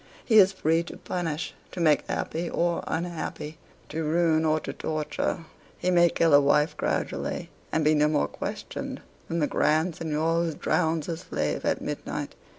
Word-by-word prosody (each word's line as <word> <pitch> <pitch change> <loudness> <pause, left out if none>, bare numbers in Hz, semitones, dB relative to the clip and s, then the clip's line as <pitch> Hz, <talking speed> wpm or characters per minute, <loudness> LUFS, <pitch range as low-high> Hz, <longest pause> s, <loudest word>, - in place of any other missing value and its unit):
He 220 -3 +6
is 195 -1 +7
free 165 -3 +1
to - - -9
punish, 165 -3 -3 0.2
to 185 - -7
make 155 -4 +3
happy 165 +2 -2
or 170 0 0
unhappy 160 -2 -4 0.3
to 160 - -3
ruin 160 0 +2
or 155 0 +3
to - - -5
torture. 155 +1 -2 0.4
He 180 - 0
may 175 -1 +6
kill 165 -2 +2
a 145 - +8
wife 150 +2 +3
gradually, - - -2 0.2
and 160 -1 +1
be 155 - +5
no 150 0 +4
more 150 -1 +1
questioned - - -5 0.3
than 165 - -2
the 155 - +2
Grand 155 +4 +2
seignior 165 +1 0
who 160 -2 -3
drowns 160 -3 0
a 165 - -2
slave - - -2
at - - +1
midnight. - - -4
160 Hz, 170 wpm, -27 LUFS, 155-170 Hz, 0.4 s, a